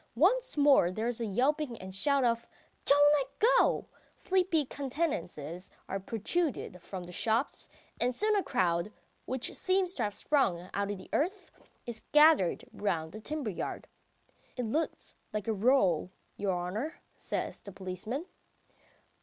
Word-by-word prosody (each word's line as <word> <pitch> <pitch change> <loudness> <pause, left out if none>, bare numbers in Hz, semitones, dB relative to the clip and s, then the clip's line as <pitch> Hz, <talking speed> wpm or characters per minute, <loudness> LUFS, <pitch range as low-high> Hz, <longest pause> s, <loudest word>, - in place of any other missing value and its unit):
Once 450 - +3
more 280 -11 +6
there 215 +5 -3
is 240 -1 -1
a 230 - -1
yelping 260 +4 0
and 185 - -8
a 190 - -8
shout 280 +6 +2
of 235 -1 +1 0.4
"Don't 290 +1 +6
let 275 -2 -1
go!" 455 +3 +4 0.3
Sleepy 365 -5 +1
countenances 190 - -3 0.2
are 195 - -2
protruded 225 - -1
from 185 -1 -6
the 175 - -9
shops, 225 - 0 0.3
and 245 0 +2
soon 425 - +4
a 405 - +3
crowd, 180 - 0 0.3
which 260 -1 -2
seems 370 -1 +1
to 265 - -4
have 205 -2 -1
sprung 185 - +1
out 200 0 -1
of 205 - -3
the 185 - -12
earth, 370 +6 -1 0.3
is 235 -2 -5
gathered 300 - +5
round 165 -6 -2
the 215 - -8
timber 295 -3 -3
yard. 175 - -5 0.7
"It 250 - -1
looks 305 +9 -2 0.2
like 215 -1 -3
a 225 - +2
row, 200 - +3 0.3
your 200 -1 -1
honour.. 200 - -3 0.2
." - - -38
says - - -4
the 200 - -9
policeman. 195 - -5
235 Hz, 155 wpm, -31 LUFS, 195-295 Hz, 0.7 s, more